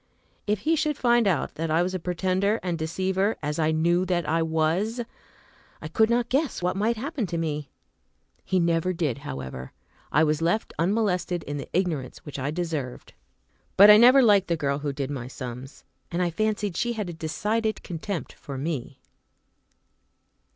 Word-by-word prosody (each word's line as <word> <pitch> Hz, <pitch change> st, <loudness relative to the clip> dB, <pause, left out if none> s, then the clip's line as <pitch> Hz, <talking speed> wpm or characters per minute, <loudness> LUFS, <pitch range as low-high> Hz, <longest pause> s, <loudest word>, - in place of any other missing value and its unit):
If 210 Hz, -1 st, 0 dB
he 325 Hz, +6 st, +2 dB
should 305 Hz, -2 st, 0 dB
find 240 Hz, -3 st, +3 dB
out 175 Hz, -7 st, 0 dB
that 165 Hz, +1 st, -3 dB
I 160 Hz, +2 st, +3 dB
was 185 Hz, +1 st, -2 dB
a 185 Hz, -, -2 dB
pretender 185 Hz, +5 st, 0 dB
and 180 Hz, -2 st, -1 dB
deceiver, 190 Hz, +5 st, -1 dB
as 150 Hz, +2 st, -2 dB
I 155 Hz, -1 st, +2 dB
knew 170 Hz, +3 st, +2 dB
that 175 Hz, -3 st, 0 dB
I 165 Hz, +1 st, +1 dB
was, 165 Hz, +8 st, 0 dB, 0.8 s
I 155 Hz, -, -6 dB
could 220 Hz, +7 st, +3 dB
not 240 Hz, 0 st, +2 dB
guess 275 Hz, +4 st, 0 dB
what 180 Hz, +1 st, -1 dB
might 220 Hz, +4 st, +1 dB
happen 265 Hz, -, -3 dB
to 170 Hz, -1 st, -3 dB
me. 150 Hz, -3 st, -3 dB, 0.7 s
He 185 Hz, -, +1 dB
never 170 Hz, +1 st, +1 dB
did, 155 Hz, -7 st, -1 dB
however. 65 Hz, -, -7 dB, 0.4 s
I 155 Hz, -, +4 dB
was 155 Hz, 0 st, +1 dB
left 170 Hz, +7 st, 0 dB
unmolested 180 Hz, -2 st, 0 dB
in 145 Hz, 0 st, -5 dB
the 140 Hz, -, -7 dB
ignorance 165 Hz, -8 st, -1 dB
which 145 Hz, -2 st, -7 dB
I 135 Hz, +2 st, -2 dB
deserved. 155 Hz, -6 st, -4 dB, 0.6 s
But 205 Hz, +2 st, +10 dB
I 210 Hz, -, +9 dB
never 255 Hz, +4 st, +7 dB
liked 205 Hz, -4 st, +5 dB
the 170 Hz, -, 0 dB
girl 140 Hz, -2 st, -1 dB
who 145 Hz, -1 st, -2 dB
did 140 Hz, 0 st, -4 dB
my 125 Hz, -4 st, -5 dB
sums, 130 Hz, +1 st, -8 dB, 0.3 s
and 175 Hz, -, -3 dB
I 175 Hz, -1 st, +1 dB
fancied 210 Hz, 0 st, -1 dB
she 240 Hz, 0 st, 0 dB
had 210 Hz, -4 st, -3 dB
a 175 Hz, -, -5 dB
decided 210 Hz, +8 st, -2 dB
contempt 175 Hz, +1 st, -5 dB
for 140 Hz, -2 st, -8 dB
me. 135 Hz, -3 st, -4 dB
175 Hz, 180 wpm, -26 LUFS, 155-210 Hz, 0.8 s, But